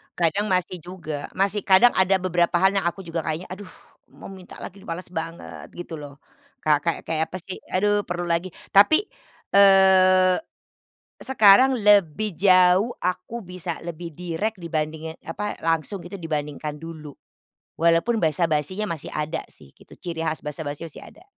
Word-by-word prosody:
Kadang 180 +5 0
masih 185 -2 -1
juga, 155 -4 -7
masih. 200 +2 +1
Kadang 195 +6 +5
ada 190 +1 +3
beberapa 180 -2 +1
hal 190 +2 +4
yang 195 -3 0
aku 190 +2 -4
juga 170 0 -4
kayaknya, 160 +3 -3
"Aduh 190 +1 -8 0.5
mau - - -11
minta 185 -2 -12
lagi 195 - -9
nih, - - -16
males 170 +2 -6
banget." 165 0 -7
Gitu 170 -2 -7
loh. 145 -1 -10 0.5
Ka 150 -2 +3
kayak-kayak 160 0 -2
apa 185 - -6
sih, 190 - -7
"Aduh 205 +2 +1
perlu 175 0 -3
lagi." 170 +1 -1 0.2
Tapi, 260 - +6 0.5
eee, 190 -2 +6 0.8
sekarang 255 +1 +5
lebih 205 - +2
jauh, 185 +3 +4
aku 220 +5 -3
bisa 180 -2 -5
lebih 170 -1 -7
direk 180 +6 -3
dibandingin, 160 -1 -4
apa, 205 +5 -4
langsung 165 +4 -1
gitu 175 +3 -10
dibandingkan 150 -1 -4
dulu. 155 -2 -9 0.7
Walaupun 170 +8 +2
basa-basinya 160 +4 0
masih 165 -5 -5
ada 155 +2 -3
sih 70 -2 -14
gitu, - - -17
ciri 165 -2 -5
khas 155 - -2
basa-basi 150 +1 -5
masih - - -10
ada. - - -17
175 Hz, 150 wpm, -23 LUFS, 160-195 Hz, 0.8 s, Tapi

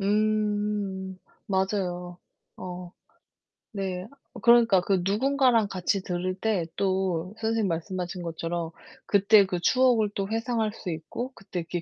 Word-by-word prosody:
음 205 -2 0 0.3
맞아요. 185 -2 -1 0.4
어 180 -1 -7 0.9
네 185 -1 -3 0.3
그러니까 235 -4 +6
그 185 +1 +1
누군가랑 245 +1 +3
같이 190 0 -1
들을 180 0 -2
때 200 -4 0
또 190 -2 0
선생님이 225 -2 +1
말씀하신 180 +2 -3
것처럼 165 0 -3 0.3
그때 200 0 +5
그 180 -2 -2
추억을 240 0 +3
또 195 0 -2
회상할 225 -1 0
수 190 -4 -6
있고 200 - -5
그때 190 -2 -6
이렇게 170 +1 -4
195 Hz, 255 characters per minute, -27 LUFS, 180-215 Hz, 0.9 s, 그러니까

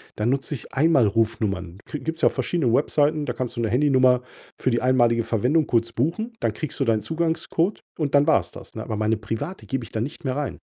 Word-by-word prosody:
dann 105 +2 0
nutze 140 +2 -1
ich - - -11
Einmalrufnummern. 110 - +1
Kri 150 - -5
gibt's 160 +1 -4
ja - - +7
auch - - -10
verschiedene 140 -10 0
Webseiten, 150 +2 +2
da - - -1
kannst 125 -2 -4
du 120 - -2
'ne 115 - 0
Handynummer 130 0 +4 0.4
für 130 - +1
die 120 - +1
einmalige 120 -2 +3
Verwendung 130 +9 +1
kurz 115 -1 +1
buchen. 170 - -1
Dann - - 0
kriegst 155 - -6
du 135 - +2
deinen 110 -2 +2
Zugangscode 165 - -1 0.2
und 145 -2 0
dann 145 0 +5
war's 160 - +3
das, - - -12
ne? - - -4
Aber 110 - -4
meine 110 +1 +1
private 115 - -5
gebe 135 -2 -2
ich - - -14
dann 110 - -2
nicht 140 +2 -7
mehr 130 0 -1
rein. 145 -5 -3
130 Hz, 225 wpm, -24 LUFS, 115-150 Hz, 0.4 s, ja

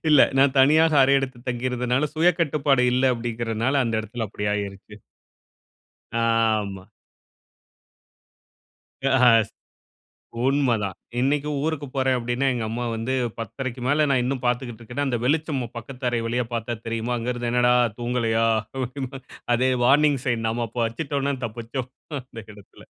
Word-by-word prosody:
இல்ல, 150 -3 +6 0.2
நான் 135 0 +4
தனியாக 155 +4 +5
அறை 135 +1 +4
எடுத்து 130 -2 -4
தங்கிருந்தனால, 125 +3 0
சுய 170 +3 +4
கட்டுப்பாடு 140 -4 +2
இல்ல 130 0 +3
அப்டின்றதனால 115 +3 -1
அந்த 115 - -1
இடத்தில 110 +1 -5
அப்படி 105 - -6
ஆயிருச்சு. 100 0 -6 1.2
ஆமா. 110 -4 0 2.2
ஆ - - +2 0.4
ஸ் - - -24 1.0
உண்ம 135 -3 +2
தான். 95 -3 -3 0.3
இன்னைக்கும் 145 +2 0
ஊருக்கு 155 -3 -2
போறேன் 130 -1 +2
அப்படினா, 120 +3 -1
எங்க 120 -2 -2
அம்மா 120 +2 -3
வந்து 115 +4 -2 0.3
10:30க்கு 130 +2 -5
மேல 150 +2 +3
நான் 130 -2 +3
இன்னும் 130 0 -2
பார்த்துக்கிட்டு 120 -1 -2
இருக்கேன்னா, 125 +5 -3
அந்த 125 -3 0
வெளிச்சம் 150 0 0 0.2
பக்கத்து 125 +1 -5
அறை 120 - 0
வழியே 120 +1 -1
பார்த்தா 115 +1 -2
தெரியுமா? 115 +1 -2
அங்கே 120 +2 -2
இருந்து 120 -1 -3
என்னடா 125 0 +4 0.3
தூங்கலையா? 115 -2 +1 1.1
அதே 130 +2 +2 0.2
வார்னிங் 145 0 +4
சைன் 115 -3 0
நாம 115 +1 -1
அப்போ 120 +2 -4
வச்சிட்டோம்னா 140 +4 -2
தப்பிச்சோம், 120 +3 -5 0.3
அந்த 125 -2 -12
இடத்தில. 100 -1 -16
125 Hz, 135 wpm, -24 LUFS, 115-135 Hz, 2.2 s, இல்ல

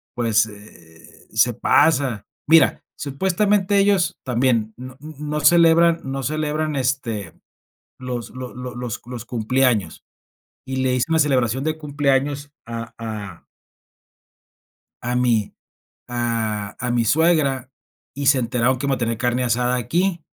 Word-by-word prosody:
pues, 115 -3 +2
eh, 85 -6 -16
se 110 +2 +3
pasa". 130 -2 +2 0.2
Mira, 160 +1 +5
supuestamente 190 +7 +1
ellos, 195 -4 +2
también 120 -3 +1
no 130 +1 -10
mm, 155 +3 -10 0.2
no 150 - -1
celebran 165 +1 +5
no 135 0 -4
celebran, 155 +2 -1
este, 125 -8 -2 0.6
los 125 -2 -5
lo 130 -1 -8
lo 125 0 -7
los 120 -3 -5
los 125 -2 -7
cumpleaños, 120 -5 0 0.6
y 130 0 -4
le 130 -1 +1
hice 125 - +1
una 160 0 +2
celebración 130 -4 +1
de 155 +1 -1
cumpleaños 145 -1 -1
a 115 0 -6
a 105 -6 -7 1.6
a 120 +1 -2
mi 120 -4 +1 0.5
a 115 -4 -2
a 120 0 -2
mi 120 -1 +2
suegra 140 -3 +2 0.4
y 140 +1 -3
se 135 -1 +5
enteraron 125 +1 +1
que 135 - -4
iba 140 -1 +1
a - - -6
tener 115 -2 -1
carne 125 +2 0
asada 125 +1 +1
aquí 170 +8 -1
130 Hz, 135 wpm, -21 LUFS, 115-150 Hz, 1.6 s, Mira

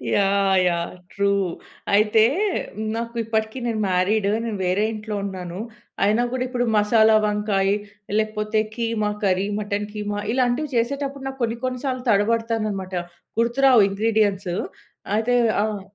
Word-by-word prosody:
Yeah! 195 -1 +3
Yeah! 170 0 -1 0.2
True. 200 0 +1 0.6
అయితే 215 +1 +4 0.7
నాకు 235 +1 -4
ఇప్పటికి 220 +2 -2
నేను 220 -2 -1
మ్యారీడ్, 195 +3 +2 0.2
నేను 225 - -3
వేరే 190 +4 +2
ఇంట్లో 210 0 -5
ఉన్నాను. 185 -2 -6 0.5
అయినా 215 +4 +3
కూడా 255 -1 0
ఇప్పుడు 245 -1 -1
మసాలా 220 +1 +5
వంకాయి 205 -2 +1 0.4
లేకపోతే 215 0 -1 0.2
కీమా 225 -3 -1
కర్రీ, 190 0 +2
మటన్ 205 0 -2
కీమా 205 -1 -3
ఇలాంటివి 255 +3 +1
చేసేటప్పుడు 275 +3 -2
నాకు 270 -1 -7
కొన్ని, 230 0 -1
కొన్ని 255 -1 -3
సార్లు 255 -1 -2
తడబడతానన్నమాట. 215 -2 0 0.5
గుర్తురావు 240 -2 +5
ఇంగ్రీడియెంట్స్. 205 -2 +1 0.6
అయితే 235 +3 +1 0.3
ఆహ్ 210 -2 -2
215 Hz, 125 wpm, -23 LUFS, 200-235 Hz, 0.7 s, మసాలా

